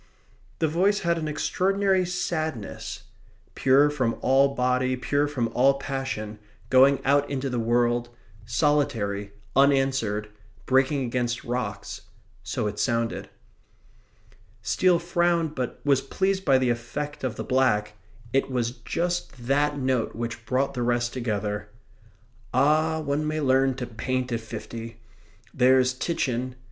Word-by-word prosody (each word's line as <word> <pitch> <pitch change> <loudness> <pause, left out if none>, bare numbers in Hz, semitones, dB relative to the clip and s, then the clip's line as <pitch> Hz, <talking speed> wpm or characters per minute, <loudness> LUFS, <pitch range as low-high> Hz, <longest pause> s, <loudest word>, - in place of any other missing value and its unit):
The 160 - +1
voice 190 +6 +2
had 170 -1 +1
an 155 - -3
extraordinary 190 +4 +1
sadness. 160 - -3 0.5
Pure 140 +3 +4
from 130 -6 -1
all 135 +1 +3
body, 125 0 +1
pure 145 +3 0
from 125 -6 -1
all 130 +4 +3
passion, 135 -6 -4 0.3
going 135 +2 +6
out 140 +1 +3
into 135 -1 -2
the 125 - -1
world, 120 +1 +1 0.3
solitary, 115 -5 0 0.2
unanswered, 135 -6 +2 0.4
breaking 135 +1 +2
against 120 +1 -2
rocks 110 -5 -4 0.4
so 110 +3 -3
it 105 0 -3
sounded. 115 -1 -1 1.3
Steele 175 - +3
frowned; 170 -2 +1
but 130 -4 -4
was 140 -2 +3
pleased 190 +6 -1
by 135 -7 +4
the 130 -2 +2
effect 140 +6 -5
of 130 -3 -2
the - - -4
black 105 -5 +1 0.4
it 135 0 +2
was 120 -2 -1
just 170 -2 -3
THAT 145 +3 +1
note 130 -4 0
which 115 0 -5
brought 135 +2 0
the 125 - -3
rest 120 0 0
together. 105 -4 -3 0.9
"Ah, 155 +4 +3
one 150 +1 -1
may 155 0 -1
learn 135 -2 +3
to 125 -1 -4
paint 125 +2 -3
at 115 - 0
fifty! 115 0 -8 0.5
There's 130 0 +4
Titian..." 130 -4 -2
130 Hz, 130 wpm, -25 LUFS, 120-145 Hz, 1.3 s, going